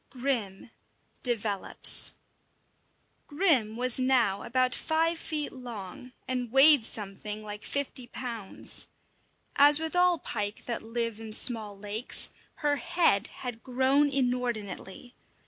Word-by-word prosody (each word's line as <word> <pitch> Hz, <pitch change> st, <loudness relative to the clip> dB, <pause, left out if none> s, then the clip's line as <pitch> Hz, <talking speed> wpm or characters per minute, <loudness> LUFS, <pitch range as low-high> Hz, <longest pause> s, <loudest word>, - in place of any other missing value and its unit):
XII: -, -, -11 dB
GRIM 230 Hz, -7 st, -2 dB, 0.5 s
DEVELOPS 215 Hz, -5 st, -1 dB, 1.1 s
Grim 290 Hz, -, +1 dB
was 255 Hz, +1 st, +2 dB
now 245 Hz, -7 st, +2 dB
about 255 Hz, +1 st, 0 dB
five 330 Hz, +1 st, 0 dB
feet 300 Hz, -2 st, -4 dB
long, 245 Hz, -1 st, -9 dB
and 250 Hz, -2 st, -3 dB
weighed 270 Hz, 0 st, +8 dB
something 210 Hz, 0 st, -3 dB
like 210 Hz, 0 st, -7 dB
fifty 270 Hz, -3 st, -3 dB
pounds. 230 Hz, -5 st, -2 dB, 0.7 s
As 290 Hz, +1 st, +7 dB
with 320 Hz, +1 st, -4 dB
all 360 Hz, -1 st, +4 dB
pike 205 Hz, -7 st, -5 dB
that 235 Hz, -, -3 dB
live 230 Hz, -1 st, -3 dB
in 220 Hz, -1 st, -8 dB
small 215 Hz, -4 st, +3 dB
lakes, 210 Hz, +4 st, -1 dB, 0.3 s
her 290 Hz, 0 st, +2 dB
head 250 Hz, -, +1 dB
had 245 Hz, -3 st, -8 dB
grown 265 Hz, +3 st, +2 dB
inordinately. 245 Hz, -4 st, -3 dB
245 Hz, 115 wpm, -28 LUFS, 215-275 Hz, 1.1 s, weighed